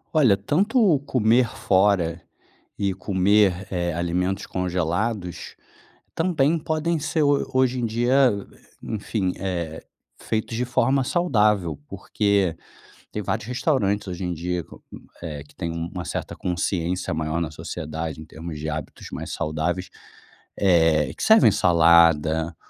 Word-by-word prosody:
Olha, 120 -11 +5
tanto 190 - +2
comer 120 0 +3
fora 95 -3 +1 0.6
e 100 -2 0
comer, 95 0 +2
eh, 85 -2 -1
alimentos 90 +3 -1
congelados, 90 +2 -2 0.6
também 165 -2 +2
podem 160 +2 -1
ser 160 +1 -1
ho 145 -1 +2
hoje 130 -1 +2
em 120 - 0
dia, 120 +4 +3 0.5
enfim, 105 -3 -2
eh, 85 -4 -4 0.4
feitos 110 +1 -2
de 125 +2 -1
forma 130 +2 +2
saudável, 105 - +1
porque 100 -5 0 0.6
tem - - -3
vários - - -2
restaurantes 110 -6 0
hoje 90 0 -5
em 90 -1 -2
dia 90 +1 -3
co - - -16
hum, - - -11 0.2
eh, 75 -4 -6
que 75 - -21
têm 85 - -4
uma 85 +2 -5
certa - - -4
consciência 90 0 -2
maior 80 +1 -2
na 80 -2 -3
sociedade 80 +1 -5
em 80 - -9
termos 80 0 -8
de 75 - -4
hábitos 75 -2 -6
mais - - -6
saudáveis, 85 +4 -2 0.7
eh, 80 -5 +3
que - - -9
servem - - +6
salada, 85 -1 +4
95 Hz, 130 wpm, -23 LUFS, 85-115 Hz, 0.7 s, servem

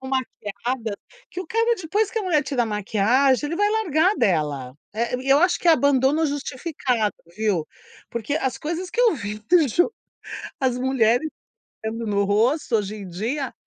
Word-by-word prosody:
tão 265 - -7
maquiada 235 -3 -3 0.3
que 365 - -5
o 370 - -7
cara, 460 +1 +2
depois 400 +4 0
que 455 - -2
a - - -2
mulher 330 -6 +2
tira 270 -3 0
a - - -1
maquiagem, 225 +7 +2
ele 335 - -3
vai 415 +2 +3
largar 385 -3 +2
dela. 145 -8 0 0.2
Eh, 235 +3 -1
e 270 - -5
eu 275 - +6
acho 355 +3 +3
que 350 - +1
é - - +9
abandono 285 +1 +3
justificado, 270 -5 -2 0.2
viu. 205 -8 0 0.4
Porque 235 +4 -3
as 265 -5 -1
coisas 340 +4 -3
que 475 - -1
eu 470 -5 +5
vi 210 -6 -5
do 315 +7 +3
jo 350 - +2 0.7
as 255 -2 +1
mulheres 255 +2 +2 0.6
aplicando 225 +1 -3
no 200 -1 +1
rosto 230 +6 +2
hoje 210 0 -3
em 200 -2 -8
dia, 235 - -3
265 Hz, 180 wpm, -23 LUFS, 220-320 Hz, 0.7 s, é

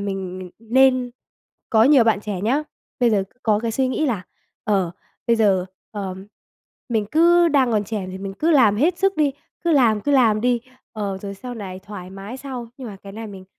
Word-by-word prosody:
mình 195 -2 -4
mình 185 -1 -8
nên 255 +2 +3 0.6
có 220 -2 +5
nhiều 270 -2 +6
bạn 220 -3 +2
trẻ 205 -3 -4
nhá 255 +9 +1 0.4
bây 240 -1 +4
giờ 200 -3 +2 0.2
có 215 -2 +2
cái 230 +1 -2
suy 260 +3 +1
nghĩ 305 +4 0
là, 220 -9 -1 0.4
ờ, 195 -5 +1 0.4
bây 235 - +3
giờ, 195 -5 +2 0.2
ờ, 195 -3 -4 0.7
mình 220 -4 0
cứ 345 +2 +5
đang 275 -5 +3
còn 210 -1 +1
trẻ 205 -2 -4
thì 190 - -7
mình 195 0 -6
cứ 315 +11 +1
làm 235 -10 +5
hết 335 +9 +2
sức 390 -1 +1
đi, 295 -3 +2 0.3
cứ 340 - +3
làm, 235 -7 +4
cứ 290 +6 0
làm 225 -6 +4
đi, 245 0 +1 0.3
ờ, 200 -3 -3
rồi 200 -1 -5
sau 245 +5 -8
này 190 -5 -7
thoải 190 -2 -9
mái 195 +5 -8
sau. 260 -3 -7
Nhưng 255 -3 -7
mà 200 - -9
cái 195 0 -10
này 225 +1 -7
mình 195 -3 -10
220 Hz, 210 wpm, -22 LUFS, 200-260 Hz, 0.7 s, nhiều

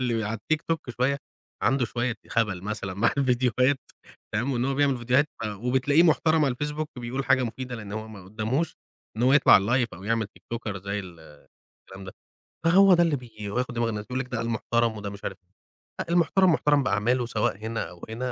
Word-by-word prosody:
اللي 115 -4 0
على 115 +2 -3
الTikTok 160 +7 -1 0.2
شوية 135 +3 +1 0.4
عنده 130 +3 +2
شوية 120 +1 -2
خبل 105 -6 0
مثلًا 100 -2 -4
مع 105 +5 +2
الفيديوهات 130 0 +2 0.6
تمام، 120 +6 0
وإن 120 -1 0
هو 135 +1 0
بيعمل 140 -1 +2
فيديوهات 125 +5 +2 0.4
وبتلاقيه 130 +5 +3
محترم 160 -1 +3
على 135 -3 +1
الFacebook 150 +1 -2
بيقول 125 +3 -3
حاجة 130 0 +3
مفيدة، 125 +1 -4
لأن 105 -3 -8
هو 110 +1 -5
ما 100 -4 -11
قداموش 110 - -2 0.4
إن 115 - -1
هو 130 +2 +5
يطلع 145 -1 +6
على 120 +6 +5
الLive - - -26
أو 90 +3 -11
يعمل 115 0 0
TikToker 110 0 -6
زي 100 +2 -4
ال 90 -4 -11 0.5
الكلام 95 0 -14
ده، 95 - -8 0.5
فهو 190 +3 +7
ده 175 -1 +5
اللي 165 -3 +2
بييجي 110 -5 -8
وياخد 125 +3 -2
دماغ 115 -1 0
الناس، 105 -1 -4
يقول 125 +2 -3
لِك 130 - -3
ده 115 -2 -2
محترم 115 0 0
وده 100 -1 -5
مش 100 0 -10
عارف 95 - -4 0.6
لأ - - -4
المحترم 175 +2 +4
محترم 145 -2 +3
بأعماله، 120 +3 +1
سواء 110 -4 -1
هنا 110 +2 -4
أو 90 -1 -15
هنا 125 +3 -3
120 Hz, 195 wpm, -26 LUFS, 105-135 Hz, 0.6 s, فهو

